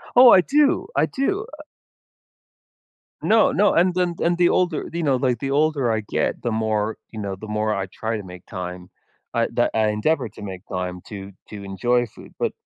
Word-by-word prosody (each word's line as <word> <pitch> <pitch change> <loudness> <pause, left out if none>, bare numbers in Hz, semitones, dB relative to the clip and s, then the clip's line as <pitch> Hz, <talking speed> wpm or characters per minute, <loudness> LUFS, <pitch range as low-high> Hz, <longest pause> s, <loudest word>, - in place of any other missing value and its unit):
Oh, 250 0 +9
I 185 - +8
do, 295 - +2
I - - +4
do, 390 +11 -1
uh - - -9 1.6
No, 220 0 +4
no, 205 +2 +3
and 180 +1 +3
then 180 -1 0
and 175 +1 +2
the 175 -1 +5
older 180 -3 0
you 170 +1 -2
know, 140 -4 +2
like, 125 -2 0
the 135 +3 -3
older 145 -4 +2
I 110 - 0
get, - - -1
the 120 - -1
more 110 -1 -1
you 110 - -7
know, 100 -2 -4
the 110 - -7
more 105 0 0
I 95 -1 -2
try 110 +4 -4
to 105 - -5
make 90 -1 -11
time, 90 -2 -7 0.4
I - - +1
that - - +2
I 110 -1 +2
endeavor 120 +5 0
to 105 - -13
make 95 -3 -7
time 90 -1 -3
to 100 -2 -8 0.2
to 105 -2 -8
enjoy 120 +5 0
food, 110 - -15
but, - - 0
115 Hz, 205 wpm, -22 LUFS, 105-170 Hz, 1.6 s, Oh